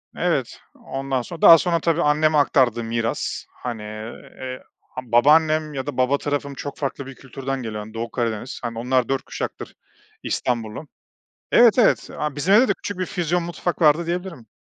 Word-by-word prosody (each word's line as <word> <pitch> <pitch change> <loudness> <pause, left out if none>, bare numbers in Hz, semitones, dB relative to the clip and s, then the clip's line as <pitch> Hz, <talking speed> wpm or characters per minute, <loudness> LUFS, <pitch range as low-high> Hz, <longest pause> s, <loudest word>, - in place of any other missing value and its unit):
Evet, - - -1 0.2
ondan 135 -1 -3
sonra 165 +6 -9
daha 165 - +10
sonra 170 0 0
tabii, 165 +1 +1
anneme 155 +1 +3
aktardığı 125 -5 +3
miras. 115 0 -2 0.2
Hani, 120 -3 -4
eee, 115 +4 -8 0.2
ha 130 - -9
babaannem 155 +5 +3
ya 135 -1 -4
da 145 -3 -5
baba 130 +2 +2
tarafım 145 -1 -3
çok 140 +1 -7
farklı 140 -1 -4
bir 135 -1 -10
kültürden 135 0 -5
geliyor, 105 -1 -5
hani, 110 +1 -12
Doğu 115 +1 -5
Karadeniz. 115 0 -3
Hani, 115 -1 -4
onlar 125 +1 +1
4 135 -1 0
kuşaktır - - -6 0.5
İstanbullu. 120 +4 -3 0.6
Evet, 235 0 +6
evet, 225 - +3
a 150 -2 -3
bizim 180 +7 +1
evde 245 +5 +6
de - - +2
küçük 200 -2 -7
bir 185 - 0
füzyon 175 -1 -1
mutfak 175 +1 -4
vardı 155 +2 +4
diyebilirim. 170 - -5
135 Hz, 170 wpm, -22 LUFS, 120-160 Hz, 0.6 s, daha